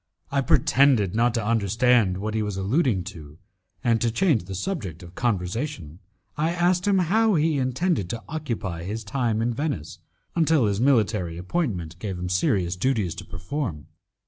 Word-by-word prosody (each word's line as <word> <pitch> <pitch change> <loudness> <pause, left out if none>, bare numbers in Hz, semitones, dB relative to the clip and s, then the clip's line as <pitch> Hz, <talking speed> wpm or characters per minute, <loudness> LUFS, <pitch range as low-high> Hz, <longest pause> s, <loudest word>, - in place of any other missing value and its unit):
I 140 0 +2
pretended 130 -6 +3
not 120 +2 +2
to 115 -3 -1
understand 115 -2 +2
what 105 +2 -3
he 110 - 0
was 105 -2 -3
alluding 105 - +1
to, 75 -3 -12 0.5
and 115 -3 +2
to 120 - +2
change 130 - +2
the 95 +1 -6
subject 100 - -4
of 85 +1 -12
conversation 95 - -2 0.4
I 160 +3 0
asked 180 +2 +1
him 200 -1 +4
how 210 +4 +3
he 155 -2 +2
intended 130 - 0
to 115 -1 -5
occupy 115 - -4
his 105 +6 -4
time 115 0 -1
in 120 +1 0
Venice 120 - -3 0.4
until 160 -6 +3
his 100 +1 0
military 105 -10 +2
appointment 90 - -3
gave 95 -3 -4
him 90 0 -4
serious 90 0 +1
duties 100 -4 0
to - - -9
perform. 90 - -4
115 Hz, 165 wpm, -25 LUFS, 95-140 Hz, 0.5 s, him